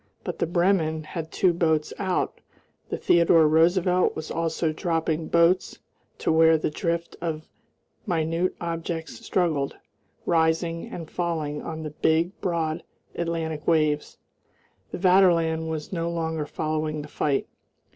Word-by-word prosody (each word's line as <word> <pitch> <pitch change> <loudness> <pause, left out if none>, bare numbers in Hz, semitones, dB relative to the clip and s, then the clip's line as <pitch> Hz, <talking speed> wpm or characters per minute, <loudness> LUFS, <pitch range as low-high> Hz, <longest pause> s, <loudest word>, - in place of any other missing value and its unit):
But - - -5
the - - +1
Bremen 170 -3 +1
had 160 +1 -6
two 185 -2 +3
boats 160 -3 +1
out; 190 -3 -1 0.5
the - - -2
Theodore 170 -2 +5
Roosevelt 175 +3 +3
was 155 - -6
also 165 -1 -1
dropping 160 -1 -1
boats 170 +2 +3 0.4
to - - 0
where 160 0 +5
the 155 - -2
drift 170 +1 -2
of 160 -2 -3 0.6
minute 165 0 0
objects 165 -1 -4
struggled, 155 -7 0 0.5
rising 165 0 +1
and 165 -2 -7
falling 155 -4 -2
on 160 -1 -6
the 155 - -5
big, 160 +3 +1
broad 165 -2 -1 0.3
Atlantic 165 -2 -3
waves.... 155 -2 +1 0.7
The - - -5
Vaterland 170 -4 +3
was 155 +2 -5
no 170 -1 -1
longer 160 -2 -2
following 155 -1 -2
the - - -9
fight. 145 -2 -1
165 Hz, 130 wpm, -25 LUFS, 155-170 Hz, 0.7 s, Theodore